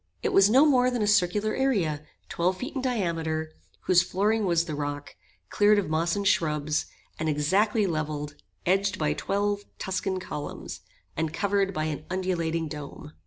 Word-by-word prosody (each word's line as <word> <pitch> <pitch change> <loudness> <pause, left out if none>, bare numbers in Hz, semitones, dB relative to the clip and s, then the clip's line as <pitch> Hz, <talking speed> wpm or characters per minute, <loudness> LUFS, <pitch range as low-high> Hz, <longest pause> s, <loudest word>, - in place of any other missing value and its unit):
It - - 0
was 195 +1 +6
no 265 +7 +6
more 255 -4 +4
than 245 -3 -1
a - - +2
circular 210 +1 +2
area, 195 - 0 0.3
twelve 180 +2 0
feet 255 +8 -5
in 265 - -3
diameter, 165 -10 -1 0.3
whose 180 -1 +4
flooring 205 +4 0
was 170 -1 +2
the 160 - -5
rock, 145 0 -4 0.4
cleared 210 0 +4
of 190 -6 -1
moss 165 +2 +1
and 200 0 -1
shrubs, 155 -5 +1 0.3
and 160 0 0
exactly 195 +9 +2
levelled, 155 -3 -3 0.3
edged 195 +2 +1
by 150 -3 +1
twelve 205 +1 -1 0.2
Tuscan 190 0 -2
columns, 150 -5 -6 0.4
and 160 -1 -1
covered 200 +3 0
by 155 -5 -2
an 155 -1 -4
undulating 170 -3 -1
dome. 150 +1 -8
180 Hz, 165 wpm, -27 LUFS, 155-205 Hz, 0.4 s, was